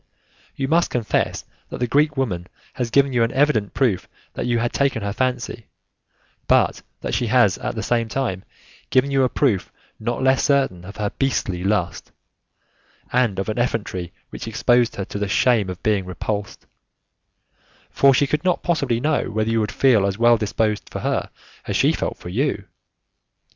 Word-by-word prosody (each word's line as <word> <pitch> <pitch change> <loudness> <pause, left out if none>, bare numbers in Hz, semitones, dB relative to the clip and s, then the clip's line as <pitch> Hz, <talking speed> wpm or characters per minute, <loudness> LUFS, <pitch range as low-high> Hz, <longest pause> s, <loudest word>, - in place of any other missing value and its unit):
You 135 - -2
must 170 +4 +2
confess 120 -3 -1 0.2
that - - -6
the 125 - 0
Greek 145 +4 +2
woman 90 -10 -2 0.3
has 125 -2 -2
given 140 +2 +3
you 120 - +2
an 115 - +2
evident 135 -8 +1
proof 115 -8 +1 0.2
that - - -3
you 120 -1 +2
had 120 +1 -1
taken 135 -6 0
her 100 0 -2
fancy, 125 -2 -2 0.8
but - - +3 0.2
that - - -4
she - - 0
has - - +3
at - - -4
the - - -3
same 115 -1 0
time 110 -8 -2 0.5
given 130 +2 +2
you 135 -1 +3
a 130 - +3
proof 120 -10 0 0.3
not 120 +3 -2
less 130 0 +3
certain 135 - +1
of 100 - -9
her 105 -1 -1
beastly 100 -9 0
lust, 95 -2 -1 1.0
and 120 -6 +2
of 95 - -2
an 110 +2 -2
effrontery 100 -7 -2 0.2
which - - -7
exposed 120 +1 +2
her 100 - -3
to 100 - -6
the 105 - -1
shame 105 +1 +3
of 90 - -7
being 105 -3 +1
repulsed, 100 +2 -4 1.3
for 140 - +5
she 135 +2 +3
could 150 +3 -1
not 180 -1 +1
possibly 140 -9 0
know 150 +3 0
whether 110 +1 -1
you 115 - +2
would 105 -1 -1
feel 115 -7 +3
as 100 0 -2
well 120 +1 +5
disposed 105 -1 -1
for - - -6
her - - -1 0.4
as - - -2
she - - +3
felt - - -3
for 90 - -9
you. 125 +2 -1
115 Hz, 180 wpm, -22 LUFS, 100-135 Hz, 1.3 s, for